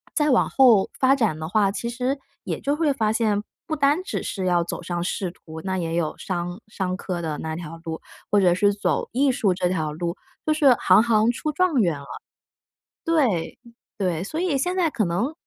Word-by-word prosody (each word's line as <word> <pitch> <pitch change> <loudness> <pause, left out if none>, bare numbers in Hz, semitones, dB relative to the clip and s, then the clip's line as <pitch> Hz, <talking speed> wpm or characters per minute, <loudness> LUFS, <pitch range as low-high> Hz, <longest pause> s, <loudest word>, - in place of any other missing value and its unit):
再 300 -1 +2
往 250 - +3
后 235 -7 +5
发 265 0 +5
展 215 - 0
的 155 - -4
话， 200 -1 +3
其 235 +3 -4
实 255 +3 -1 0.3
也 - - -3
就 285 - 0
会 305 -1 +2
发 220 -4 +1
现， 215 -3 +1 0.3
不 315 - -1
单 290 +4 +2
只 395 - -3
是 190 -2 -3
要 175 -1 +2
走 175 - -5
上 175 0 -3
仕 185 0 -2
途， 160 -2 -11
那 190 -1 -2
也 165 -2 -2
有 165 -3 -1
商 175 +1 -4
商 190 -3 -3
科 180 -3 -4
的 155 -2 -3
那 160 0 -4
条 165 -1 -7
路， 160 -1 -5 0.3
或 205 - +5
者 180 -2 +5
是 205 +3 +3
走 200 - -1
艺 275 +3 +3
术 205 -6 +1
这 180 -1 0
条 160 -4 -1
路， 170 +2 -3 0.3
就 310 - +3
是 285 -4 +5
行 185 -2 +5
行 225 -1 +3
出 305 +5 -3
状 365 0 +2
元 165 -7 +1
了。 140 - -12 1.0
对， 265 - +1 0.4
对， 180 -5 -1
所 305 +11 -5
以 350 -6 +1
现 360 +7 -1
在 350 -4 +2
可 225 -8 0
能 200 - -1
205 Hz, 225 characters per minute, -24 LUFS, 175-270 Hz, 1.0 s, 后